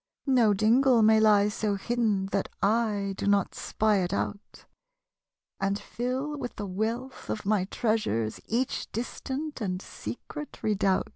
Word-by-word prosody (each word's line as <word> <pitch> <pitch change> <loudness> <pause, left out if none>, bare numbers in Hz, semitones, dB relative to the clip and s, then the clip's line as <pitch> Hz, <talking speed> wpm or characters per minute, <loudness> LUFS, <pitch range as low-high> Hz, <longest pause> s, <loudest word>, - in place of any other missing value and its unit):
No 240 -7 +4
dingle 235 +3 +4
may 220 0 +6
lie 210 -2 +5
so 210 0 -1
hidden 210 -2 0
That 195 - 0 0.7
/ - - -31
do - - -2
not 200 -2 +2
spy 215 -1 +1
it 180 -2 0
out, 205 0 -4 0.9
And 195 +1 0
fill 255 +7 -3
with 245 - -5
the 205 - -4
wealih 225 +7 -3
of 210 - -3
my 205 -2 +2
treasures 190 - -1
Each 245 +3 -1
distant 265 +5 -4
and 185 -3 -1
secret 295 +8 -8
redoubt. 200 -3 +1
215 Hz, 140 wpm, -28 LUFS, 200-245 Hz, 0.9 s, may